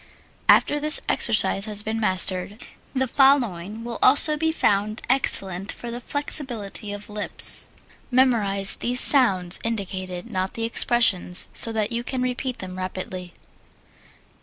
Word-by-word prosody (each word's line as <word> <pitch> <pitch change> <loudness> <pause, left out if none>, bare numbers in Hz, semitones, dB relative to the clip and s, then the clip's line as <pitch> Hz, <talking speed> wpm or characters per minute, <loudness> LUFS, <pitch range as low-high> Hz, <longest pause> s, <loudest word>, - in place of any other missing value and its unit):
After 295 - +4
this 305 +1 +3
exercise 195 -1 +2
has 210 -1 -4
been 220 +1 -4
mastered, 190 +1 -2 0.3
the 265 0 0
following 230 -7 +1
will 235 -1 -4
also 290 +3 +6
be 320 +1 -1
found 210 -7 -1
excellent 195 -7 +2
for 240 0 -7
flexibility 240 -7 -3
of 205 +1 -8
lips: 210 -1 +1 0.4
Memorize 220 -7 0
these 250 +1 -1
sounds 190 -12 +4
indicated 190 -2 -5
(not 185 -1 -4
the 230 - -5
expressions) 225 -6 +2
so 230 - +5
that 215 0 -2
you 235 0 -3
can 255 0 -4
repeat 255 0 -4
them 185 -1 -9
rapidly. 185 -1 -7
220 Hz, 130 wpm, -22 LUFS, 190-250 Hz, 0.4 s, also